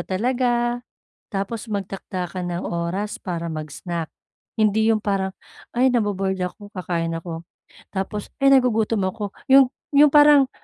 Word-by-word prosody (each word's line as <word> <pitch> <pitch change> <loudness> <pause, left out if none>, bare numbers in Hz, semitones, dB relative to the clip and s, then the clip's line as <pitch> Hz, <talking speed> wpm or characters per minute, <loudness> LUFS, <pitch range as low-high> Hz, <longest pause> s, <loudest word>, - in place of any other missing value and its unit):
talaga, 240 +3 0 0.5
tapos 205 +3 -4
magtakda 195 -2 -4
ka 180 +1 -6
ng 175 0 -3
oras 175 +5 -3
para 170 -3 -4
mag-snack. 155 +2 -5 0.5
Hindi 220 +1 +3
yung 215 - +2
parang, 195 -2 -1 0.4
"Ay, 250 +2 +3
nabo-bored 200 -5 0
ako 205 +3 -6
kakain 165 -2 -2
ako." 165 0 -6 0.5
tapos, 195 +2 -3 0.2
"Ay, 275 - +7
nagugutom 225 -5 +3
ako." 205 +1 -4 0.2
yung 270 -1 +7 0.3
yung 295 +1 +8
parang 290 -2 +7
200 Hz, 130 wpm, -23 LUFS, 180-240 Hz, 0.5 s, yung